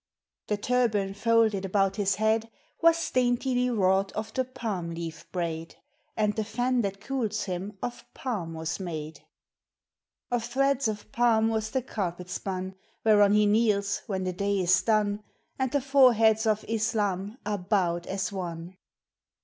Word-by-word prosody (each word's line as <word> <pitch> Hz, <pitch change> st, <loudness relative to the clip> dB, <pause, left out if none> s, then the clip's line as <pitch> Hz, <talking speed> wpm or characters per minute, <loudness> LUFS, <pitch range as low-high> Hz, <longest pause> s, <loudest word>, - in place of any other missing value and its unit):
The 210 Hz, -, 0 dB
turban 210 Hz, -4 st, +1 dB
folded 220 Hz, -1 st, +2 dB
about 195 Hz, +1 st, +1 dB
his 200 Hz, -2 st, +1 dB
head 220 Hz, +2 st, +1 dB, 0.3 s
Was 335 Hz, 0 st, +3 dB
daintily 250 Hz, 0 st, +1 dB
wrought 195 Hz, -3 st, +2 dB
of 215 Hz, +1 st, -5 dB
the 260 Hz, -, +1 dB
palm 220 Hz, -9 st, -4 dB
leaf 165 Hz, 0 st, -7 dB
braid, 165 Hz, -2 st, -3 dB, 0.4 s
And 210 Hz, -1 st, +1 dB
the 220 Hz, -, 0 dB
fan 245 Hz, +3 st, 0 dB
that 195 Hz, -2 st, -3 dB
cools 220 Hz, -2 st, -2 dB
him 195 Hz, +2 st, -5 dB
of 245 Hz, -, -4 dB
palm 190 Hz, -11 st, -4 dB
was 160 Hz, 0 st, -3 dB
made. 160 Hz, -4 st, -5 dB, 1.1 s
Of 245 Hz, -2 st, 0 dB
threads 275 Hz, +1 st, +1 dB
of 215 Hz, 0 st, -5 dB
palm 225 Hz, -2 st, +3 dB
was 220 Hz, -1 st, -1 dB
the 260 Hz, +2 st, -1 dB
carpet 180 Hz, -6 st, -4 dB
spun 185 Hz, 0 st, -4 dB, 0.3 s
Whereon 205 Hz, -2 st, +6 dB
he 210 Hz, 0 st, +5 dB
kneels 205 Hz, -2 st, +2 dB
when 190 Hz, -2 st, -2 dB
the 185 Hz, 0 st, -2 dB
day 200 Hz, +1 st, 0 dB
is 185 Hz, +1 st, +4 dB
done, 210 Hz, -2 st, +1 dB, 0.4 s
And 260 Hz, -2 st, 0 dB
the 285 Hz, 0 st, +1 dB
foreheads 235 Hz, -5 st, +4 dB
of 215 Hz, -1 st, +1 dB
Islam 215 Hz, -2 st, -1 dB
are 205 Hz, -1 st, -1 dB
bowed 180 Hz, -3 st, 0 dB
as 195 Hz, +1 st, -2 dB
one! 175 Hz, -1 st, -6 dB
210 Hz, 150 wpm, -27 LUFS, 190-230 Hz, 1.1 s, Whereon